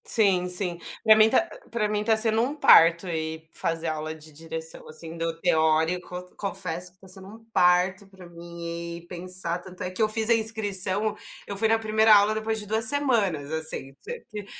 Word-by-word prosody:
Sim, 190 Hz, -5 st, +1 dB
sim, 180 Hz, -1 st, -2 dB, 0.2 s
pra 220 Hz, -1 st, +7 dB
mim 215 Hz, 0 st, +5 dB
tá 300 Hz, +8 st, +2 dB, 0.2 s
pra 225 Hz, -2 st, -1 dB
mim 210 Hz, 0 st, -2 dB
tá 220 Hz, 0 st, +2 dB
sendo 220 Hz, 0 st, +4 dB
um 265 Hz, +5 st, -2 dB
parto 165 Hz, -, +5 dB
ir 160 Hz, -1 st, -5 dB
fazer 165 Hz, 0 st, -1 dB
aula 155 Hz, 0 st, -4 dB
de 155 Hz, 0 st, -12 dB
direção, 160 Hz, +1 st, -8 dB
assim, 160 Hz, +1 st, -11 dB
do 165 Hz, 0 st, -4 dB
teórico, 165 Hz, +2 st, 0 dB
confesso 180 Hz, -3 st, -5 dB
que 185 Hz, -, -37 dB
tá 190 Hz, -, -17 dB
sendo 190 Hz, +1 st, -10 dB
um 225 Hz, +3 st, -14 dB
parto 180 Hz, +3 st, +2 dB
pra 190 Hz, -2 st, -15 dB
mim 170 Hz, 0 st, -8 dB
e 170 Hz, -, -14 dB
pensar 180 Hz, -1 st, -5 dB
tanto 185 Hz, +2 st, -10 dB
é 180 Hz, -, -4 dB
que 185 Hz, -, -5 dB
eu 215 Hz, -, +2 dB
fiz 220 Hz, 0 st, -1 dB
a -, -, +6 dB
inscrição 215 Hz, -2 st, +1 dB, 0.3 s
eu 200 Hz, -, -6 dB
fui 220 Hz, +3 st, +1 dB
na 225 Hz, +1 st, +2 dB
primeira 220 Hz, 0 st, +4 dB
aula 205 Hz, +1 st, +3 dB
depois 220 Hz, 0 st, -3 dB
de 210 Hz, -, -8 dB
2 220 Hz, +2 st, +3 dB
semanas 220 Hz, -, +3 dB
assim, 160 Hz, -4 st, -3 dB
t 475 Hz, +1 st, -9 dB
t 210 Hz, -1 st, -7 dB
185 Hz, 195 wpm, -25 LUFS, 170-215 Hz, 0.3 s, pra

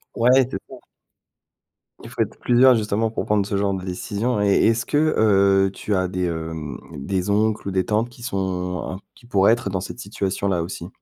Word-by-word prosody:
ouais, 125 Hz, +2 st, +4 dB
c'est -, -, -4 dB
ça. 130 Hz, -, -9 dB, 1.3 s
Il -, -, -10 dB
faut -, -, -7 dB
être -, -, -1 dB
plusieurs 125 Hz, +1 st, +5 dB
justement 110 Hz, 0 st, 0 dB
pour -, -, -3 dB
prendre 105 Hz, -2 st, +1 dB
ce 100 Hz, -, -2 dB
genre 100 Hz, 0 st, +1 dB
de 95 Hz, -1 st, -4 dB
décision 105 Hz, +5 st, -2 dB
et 100 Hz, -1 st, +3 dB
est-ce 115 Hz, +1 st, +2 dB
que, 145 Hz, -, 0 dB, 0.2 s
heu, 100 Hz, -2 st, +4 dB
tu 100 Hz, +2 st, -3 dB
as 95 Hz, -1 st, +1 dB
des, 90 Hz, 0 st, -2 dB
hem, 80 Hz, -4 st, -5 dB
des 95 Hz, +7 st, -3 dB
oncles 105 Hz, -1 st, +1 dB
ou -, -, -1 dB
des 95 Hz, -1 st, 0 dB
tantes 110 Hz, +3 st, 0 dB
qui 120 Hz, 0 st, -15 dB
sont, 115 Hz, -5 st, -4 dB
en 90 Hz, 0 st, -3 dB, 0.2 s
qui 120 Hz, -, -21 dB
pourraient 100 Hz, -3 st, +3 dB
être 110 Hz, -5 st, -5 dB
dans 95 Hz, -1 st, -2 dB
cette 100 Hz, -, -8 dB
situation-là 100 Hz, -4 st, -2 dB
aussi? 85 Hz, 0 st, -6 dB
100 Hz, 200 wpm, -22 LUFS, 95-110 Hz, 1.3 s, plusieurs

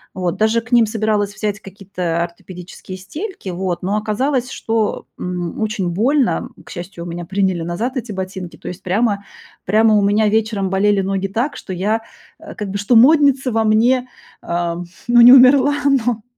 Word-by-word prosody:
Вот, 180 Hz, 0 st, -2 dB
даже 220 Hz, +2 st, +2 dB
к 225 Hz, -, -17 dB
ним 235 Hz, -3 st, +5 dB
собиралась 215 Hz, -2 st, -1 dB
взять 210 Hz, -1 st, -3 dB
какие-то 185 Hz, -4 st, -4 dB
ортопедические 180 Hz, +2 st, -10 dB
стельки, 300 Hz, -, -7 dB
вот, 180 Hz, -1 st, -3 dB
но 195 Hz, +3 st, -1 dB
оказалось, 250 Hz, +5 st, -1 dB
что, 225 Hz, -4 st, -2 dB
м, 180 Hz, +2 st, -4 dB
очень 210 Hz, -4 st, -1 dB
больно. 250 Hz, -, +1 dB, 0.2 s
К -, -, -13 dB
счастью, 175 Hz, -1 st, -8 dB
у -, -, -7 dB
меня 175 Hz, 0 st, -6 dB
приняли 190 Hz, -1 st, 0 dB
назад 195 Hz, -, -3 dB
эти 225 Hz, -4 st, -5 dB
ботинки. 190 Hz, -2 st, -6 dB
То -, -, -11 dB
есть 180 Hz, +2 st, -8 dB
прямо 200 Hz, +2 st, 0 dB, 0.4 s
прямо 220 Hz, +3 st, +3 dB
у 205 Hz, -, +4 dB
меня 205 Hz, +2 st, +2 dB
вечером 215 Hz, -2 st, 0 dB
болели 200 Hz, +1 st, +2 dB
ноги 195 Hz, 0 st, -2 dB
так, 235 Hz, +9 st, -2 dB
что -, -, -9 dB
я, 210 Hz, +5 st, -1 dB, 0.4 s
э, -, -, -11 dB
как 205 Hz, -2 st, -5 dB
бы, 200 Hz, -, -3 dB
что 205 Hz, +5 st, +1 dB
модница 270 Hz, +1 st, +5 dB
во 225 Hz, 0 st, +1 dB
мне, 240 Hz, +4 st, +2 dB, 0.3 s
ам, 175 Hz, 0 st, -3 dB, 0.2 s
ну, 240 Hz, 0 st, +6 dB
не 245 Hz, +1 st, +9 dB
умерла, 270 Hz, +2 st, +6 dB
но 245 Hz, -5 st, +1 dB
210 Hz, 175 wpm, -18 LUFS, 185-235 Hz, 0.4 s, не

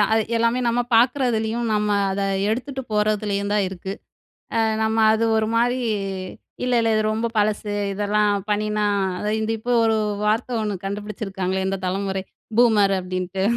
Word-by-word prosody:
அது 220 Hz, 0 st, +4 dB
எல்லாமே 230 Hz, +2 st, +2 dB
நம்ம 240 Hz, +1 st, +1 dB, 0.2 s
பார்க்குறதுலேயும், 235 Hz, -2 st, +1 dB
நம்ம 210 Hz, 0 st, +1 dB, 0.2 s
அத 200 Hz, +1 st, -2 dB, 0.3 s
எடுத்துட்டு 265 Hz, +4 st, -3 dB
போறதுலயும் 210 Hz, -1 st, 0 dB
தான் 205 Hz, -, +2 dB
இருக்கு. 190 Hz, +1 st, -6 dB, 0.6 s
அ -, -, +2 dB, 0.2 s
நம்ம 220 Hz, +1 st, 0 dB, 0.2 s
அது 225 Hz, +1 st, +1 dB
ஒரு 220 Hz, 0 st, +1 dB
மாரி 245 Hz, +2 st, +2 dB, 0.9 s
இல்ல 250 Hz, 0 st, 0 dB
இல்ல 225 Hz, -, +1 dB
இது 215 Hz, -, +2 dB
ரொம்ப 225 Hz, +2 st, -1 dB
பழசு. 210 Hz, 0 st, 0 dB, 0.2 s
இதெல்லாம் 205 Hz, 0 st, +1 dB
பண்ணினா 210 Hz, 0 st, 0 dB, 0.4 s
அத 210 Hz, -, -3 dB
இந்த 220 Hz, +1 st, -1 dB
இப்போ 245 Hz, +2 st, -3 dB
ஒரு 220 Hz, 0 st, +3 dB, 0.3 s
வார்த்தை 225 Hz, +4 st, 0 dB
ஒண்ணு 210 Hz, -1 st, -1 dB
கண்டுபிடிச்சிருக்காங்களே, 195 Hz, -2 st, -3 dB
இந்த 195 Hz, -, -1 dB
தலமுறை 190 Hz, 0 st, -2 dB, 0.3 s
பூமர் 210 Hz, -5 st, +5 dB
அப்டின்ட்டு. 185 Hz, +1 st, -3 dB
210 Hz, 145 wpm, -22 LUFS, 200-225 Hz, 0.9 s, பூமர்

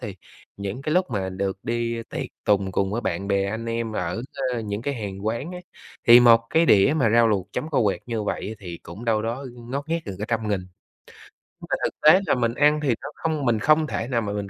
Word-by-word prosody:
thì 100 Hz, -3 st, -6 dB, 0.4 s
những 100 Hz, +6 st, -5 dB
cái 155 Hz, -, -1 dB
lúc 180 Hz, -6 st, +2 dB
mà 95 Hz, -4 st, -2 dB
được 95 Hz, +1 st, -3 dB
đi 115 Hz, 0 st, -2 dB
tiệc -, -, -3 dB, 0.2 s
tùng 100 Hz, -2 st, +2 dB
cùng 95 Hz, +1 st, 0 dB
với 115 Hz, -, -1 dB
bạn 95 Hz, -1 st, -3 dB
bè 100 Hz, -1 st, +2 dB
anh 110 Hz, +2 st, -4 dB
em 115 Hz, -1 st, -2 dB
ở, 90 Hz, +3 st, -3 dB, 0.3 s
a, 120 Hz, -, -2 dB
những 105 Hz, 0 st, -4 dB
cái 140 Hz, +2 st, -2 dB
hàng 100 Hz, -3 st, -6 dB
quán 115 Hz, +10 st, -2 dB
á, 180 Hz, -, -6 dB, 0.5 s
thì 120 Hz, +1 st, +10 dB
một 115 Hz, -1 st, +7 dB
cái 165 Hz, +1 st, +3 dB
đĩa 105 Hz, +5 st, +5 dB
mà 120 Hz, -7 st, +3 dB
rau 115 Hz, 0 st, +5 dB
luộc 100 Hz, -3 st, 0 dB
chấm 155 Hz, -, -3 dB
kho 135 Hz, -4 st, +2 dB
quẹt 100 Hz, -2 st, 0 dB
như 115 Hz, -3 st, -2 dB
vậy 105 Hz, +1 st, -3 dB
thì 90 Hz, -5 st, -7 dB
cũng 95 Hz, +8 st, -10 dB
đâu 110 Hz, -2 st, +1 dB
đó 120 Hz, +5 st, -3 dB
ngót 130 Hz, +5 st, -6 dB
nghét 165 Hz, +1 st, 0 dB
gần 95 Hz, -, -6 dB
cả 105 Hz, -, -3 dB
trăm 115 Hz, -2 st, -1 dB
nghìn. 100 Hz, -3 st, 0 dB, 1.1 s
Mà -, -, +2 dB
thực -, -, 0 dB
tế 155 Hz, +5 st, +7 dB
là -, -, +3 dB
mình 115 Hz, -2 st, 0 dB
ăn 150 Hz, +3 st, +3 dB
thì 140 Hz, -, 0 dB
nó 140 Hz, -, -6 dB
không 155 Hz, -4 st, -2 dB
mình 115 Hz, -2 st, +2 dB
không 155 Hz, +6 st, +3 dB
thể 115 Hz, -, -3 dB
nào 120 Hz, -3 st, 0 dB
mà 105 Hz, -2 st, -3 dB
mình 100 Hz, -1 st, -4 dB
115 Hz, 245 wpm, -24 LUFS, 100-130 Hz, 1.1 s, thì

